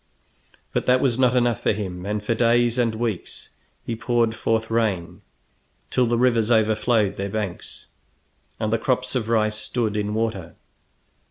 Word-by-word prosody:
But - - -1
that 125 0 +5
was 125 -2 +1
not 125 -1 +4
enough 120 -3 +2
for - - +2
him, 95 -3 -5
and 105 0 -2
for 115 - 0
days 120 +1 +2
and 115 -2 +1
weeks 110 -5 -4 0.4
he 115 - -2
poured 115 0 +1
forth 115 0 -1
rain 100 -5 -1 0.7
till 125 -1 +2
the 120 0 +1
rivers 115 -3 +2
overflowed 110 -1 +2
their 100 +1 -3
banks 100 -3 -5 0.7
and 110 0 -1
the 115 - +2
crops 130 +1 0
of 115 -4 -2
rice 110 -2 +2
stood 110 0 -1
in 105 0 -1
water. 110 -6 -2
115 Hz, 160 wpm, -23 LUFS, 105-120 Hz, 0.7 s, that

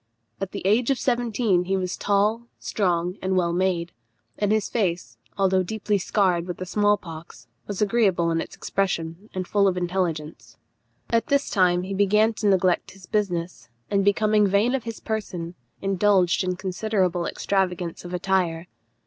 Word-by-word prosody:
At 195 - -4
the - - -6
age 225 +6 +3
of 270 - +2
seventeen 235 -7 +1
he 190 +1 0
was 185 -1 -2
tall, 210 +4 +1
strong, 180 -2 -1
and 190 0 0
well 170 -2 +1
made; 175 -1 0 0.4
and 205 -1 0
his 215 -1 +1
face, 170 - -2 0.2
although 190 -1 +3
deeply 210 +2 -1
scarred 180 -3 +1
with 180 - -4
the 185 - -5
small 205 +2 +2
pox, 165 -2 -11 0.2
was 205 0 -1
agreeable 195 -6 +2
in 165 0 +1
its - - -8
expression, 180 0 -2
and 185 -1 -3
full 200 -1 +3
of 185 -1 +1
intelligence. 175 -4 -3 0.5
At 230 -1 +2
this 280 -1 +1
time 180 -3 +3
he 195 +1 -4
began 210 +3 +3
to 210 - +1
neglect 185 -2 +2
his 190 -1 -15
business, 180 - -2 0.2
and 200 -1 +2
becoming 210 +1 +3
vain 200 +6 +2
of 260 -3 -2
his 230 -1 -6
person, 180 -6 -4 0.3
indulged 195 -1 +3
in 185 0 -1
considerable 185 -2 -1
extravagance 180 -3 -1
of 175 - -8
attire. 180 -2 0
190 Hz, 165 wpm, -24 LUFS, 175-210 Hz, 0.5 s, age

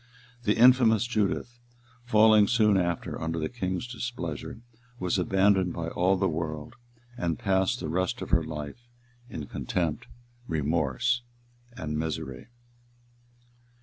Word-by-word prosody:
The 105 - +2
infamous 120 -2 +6
Judith, 120 +1 -1 0.5
falling 110 -2 +6
soon 110 -2 +3
after 85 -3 -1
under 80 +1 -2
the 80 -1 -2
king's 95 -6 -3
displeasure, 115 - -5 0.4
was 90 -2 0
abandoned 95 0 +2
by 85 -1 -4
all 95 +3 +2
the 95 +1 +1
world, 75 +1 -4 0.4
and 85 -7 -1
passed 95 -2 +1
the 80 - -4
rest 95 +9 -1
of - - -8
her 85 -2 +4
life 75 +9 -7 0.4
in 75 - -6
contempt, 80 +1 -2 0.4
remorse, 80 - 0 0.5
and 75 -8 -4
misery. 70 -2 -4
95 Hz, 120 wpm, -27 LUFS, 80-110 Hz, 0.5 s, infamous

